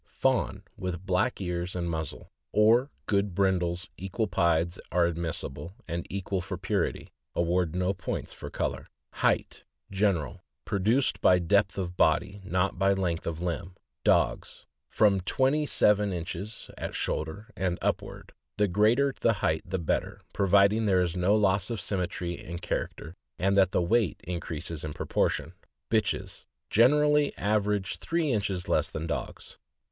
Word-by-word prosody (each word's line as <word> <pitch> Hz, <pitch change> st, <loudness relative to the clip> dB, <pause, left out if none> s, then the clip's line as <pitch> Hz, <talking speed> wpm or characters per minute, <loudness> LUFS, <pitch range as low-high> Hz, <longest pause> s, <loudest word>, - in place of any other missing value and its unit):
— -, -, -43 dB
Fawn, -, -, +1 dB
with 90 Hz, 0 st, -5 dB
black 100 Hz, +7 st, +1 dB
ears 90 Hz, -1 st, -3 dB
and 85 Hz, -1 st, -2 dB
muzzle, 80 Hz, -3 st, -5 dB, 0.2 s
or 115 Hz, +6 st, +4 dB, 0.2 s
good 100 Hz, -3 st, 0 dB
brin 95 Hz, -1 st, +3 dB
dles 85 Hz, +2 st, -3 dB
equal 95 Hz, +4 st, -2 dB
pieds 85 Hz, -2 st, +1 dB
are 90 Hz, -1 st, +3 dB
admissible 85 Hz, -1 st, -4 dB
and 85 Hz, 0 st, -4 dB
equal 95 Hz, 0 st, -2 dB
for 95 Hz, 0 st, -5 dB
purity 95 Hz, +1 st, -2 dB
— -, -, -51 dB
award 85 Hz, 0 st, +1 dB
no 90 Hz, +1 st, +1 dB
points 95 Hz, -, -5 dB
for -, -, -8 dB
color. -, -, -3 dB, 0.2 s
HEIGHT. -, -, 0 dB, 0.3 s
General. 95 Hz, -8 st, 0 dB
— -, -, -57 dB
Produced 110 Hz, +7 st, +1 dB
by 90 Hz, -, +6 dB
depth 100 Hz, +2 st, +2 dB
of 90 Hz, -2 st, -4 dB
body, 100 Hz, +1 st, +2 dB
not 95 Hz, 0 st, 0 dB
by 100 Hz, 0 st, +4 dB
length 90 Hz, -4 st, -1 dB
of 85 Hz, +1 st, -3 dB
limb. 90 Hz, +1 st, -3 dB, 0.3 s
Dogs. -, -, +1 dB
— -, -, -57 dB
From 100 Hz, -3 st, +5 dB
twenty 135 Hz, +10 st, +1 dB
seven 105 Hz, -4 st, +3 dB
inches 90 Hz, +5 st, -5 dB
at -, -, -4 dB
shoulder 100 Hz, +9 st, -3 dB
and 90 Hz, -2 st, -1 dB
up -, -, 0 dB
ward; -, -, -11 dB, 0.3 s
the 105 Hz, 0 st, +3 dB
greater 110 Hz, +9 st, +3 dB
the 115 Hz, -, +3 dB
height 80 Hz, -6 st, 0 dB
the 95 Hz, +1 st, -1 dB
better, 85 Hz, -4 st, -2 dB
providing 100 Hz, +3 st, +4 dB
there 95 Hz, -2 st, +4 dB
is 85 Hz, 0 st, -2 dB
no 90 Hz, +3 st, +3 dB
loss 100 Hz, -1 st, +2 dB
of 115 Hz, -3 st, -2 dB
symmetry 90 Hz, -2 st, -3 dB
and 85 Hz, 0 st, -6 dB
character, 85 Hz, -1 st, -3 dB, 0.2 s
and 95 Hz, +1 st, +2 dB
that 95 Hz, -2 st, +5 dB
the 90 Hz, -, +2 dB
weight 105 Hz, -1 st, +1 dB
increases 85 Hz, -2 st, -4 dB
in 75 Hz, -1 st, -4 dB
proportion. -, -, -1 dB, 0.4 s
Bitches. -, -, -1 dB
— -, -, -56 dB
Generally 150 Hz, +5 st, +4 dB
average 105 Hz, -1 st, 0 dB
three 165 Hz, -3 st, 0 dB
inches 100 Hz, -5 st, -1 dB
less -, -, +1 dB
than 80 Hz, -, -4 dB
dogs. 85 Hz, -, -5 dB
95 Hz, 160 wpm, -28 LUFS, 85-105 Hz, 0.4 s, by